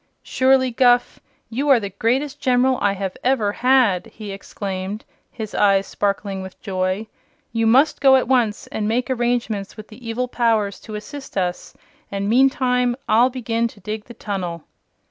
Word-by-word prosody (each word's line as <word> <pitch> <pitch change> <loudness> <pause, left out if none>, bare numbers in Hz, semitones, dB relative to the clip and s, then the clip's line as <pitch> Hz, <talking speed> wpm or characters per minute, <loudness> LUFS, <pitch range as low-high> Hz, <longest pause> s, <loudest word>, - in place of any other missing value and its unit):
"Surely, 260 0 +3
Guph, 245 0 +3 0.3
you 275 +6 -1
are 265 -4 +6
the 200 -2 -5
greatest 260 +8 -1
General 255 0 +2
I 200 -1 +2
have 190 -1 -4
ever 245 -5 +2
had!" 245 -6 +3
he 210 -2 -9
exclaimed, 195 +1 -5 0.2
his 220 -3 -7
eyes 195 -1 +3
sparkling 200 -1 -2
with 190 0 -10
joy. 185 +1 -2 0.5
"You 225 0 +1
must 270 +7 +4
go 270 -1 +7
at 260 - +2
once 235 -5 +1
and 210 -1 -3
make 245 +4 0
arrangements 235 -5 -1
with 215 - -10
the 230 +1 -10
evil 250 +2 -1
powers 225 -5 0
to 215 - -9
assist 270 +4 -8
us, 180 -2 -2 0.4
and 200 0 -2
meantime 250 0 +2
I'll 235 +4 +4
begin 235 -2 -1
to 225 - -15
dig 210 +2 -5
the 240 - -12
tunnel." 180 -6 -4
225 Hz, 165 wpm, -21 LUFS, 200-250 Hz, 0.5 s, go